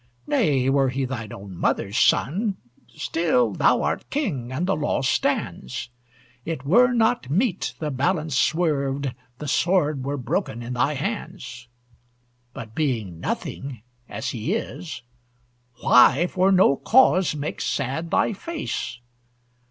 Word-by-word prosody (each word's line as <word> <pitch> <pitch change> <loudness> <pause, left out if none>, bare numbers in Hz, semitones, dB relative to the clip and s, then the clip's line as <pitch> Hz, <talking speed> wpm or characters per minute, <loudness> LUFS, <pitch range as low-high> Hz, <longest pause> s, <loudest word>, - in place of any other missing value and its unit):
Nay, 145 - +2
were 135 0 +3
he 135 +1 -1
thine 115 -5 -5
own 100 -1 -9
mother's 100 +3 -1
son, 195 - +2 0.3
Still, 150 -7 0
thou - - +3
art 75 +3 -2
king, 155 - -2
and 150 +7 -1
the 195 - +1
law 150 -2 -1
stands. 115 - -1 0.5
It 155 -3 -5
were 245 - +5
not 230 - +1
meet 195 - 0
the 155 -2 -3
balance 155 +2 0
swerved, 140 -3 +1 0.2
The 150 - -6
sword 150 -2 +1
were 140 +2 -2
broken 120 -2 -2
in 120 +2 -5
thy 125 +4 +1
hands. 135 - -5 0.8
But 110 -2 -9
being 110 - -2
nothing, 130 +3 -5 0.3
as 105 +2 -4
he 125 - -2
is, 180 - -6 0.8
Why 130 +6 +6
for 185 +2 +2
no 185 -7 +5
cause 190 -9 +4
make 150 +1 -4
sad 140 +5 -2
thy 220 - +2
face? 300 - -4
140 Hz, 130 wpm, -24 LUFS, 125-180 Hz, 0.8 s, Why